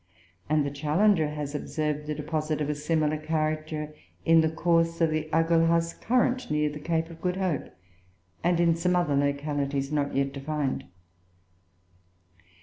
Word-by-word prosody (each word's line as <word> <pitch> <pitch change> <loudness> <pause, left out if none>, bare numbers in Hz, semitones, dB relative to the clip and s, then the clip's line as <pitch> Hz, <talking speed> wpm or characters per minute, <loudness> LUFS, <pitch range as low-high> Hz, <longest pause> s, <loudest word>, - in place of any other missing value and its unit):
And 150 -1 +2
the 140 - -2
Challenger 155 +4 +2
has 150 -1 -5
observed 150 0 -3
a 150 - -1
deposit 155 +1 -2
of 150 0 0
a - - 0
similar 155 +1 0
character 155 0 -2 0.3
in 165 0 +6
the 160 - +2
course 165 +1 +1
of 165 -2 +3
the 155 0 -2
Agulhas 165 0 +3
current, 250 +1 0
near 150 0 +1
the 150 - -7
Cape 165 +2 -1
of 165 0 -12
Good 180 0 0
Hope, 185 -5 -1 0.7
and 175 0 +2
in 170 -1 +4
some 180 +2 +1
other 175 -5 +2
localities 140 0 -1
not 145 -2 -1
yet 135 0 0
defined. 145 0 -2
155 Hz, 150 wpm, -27 LUFS, 150-165 Hz, 0.7 s, in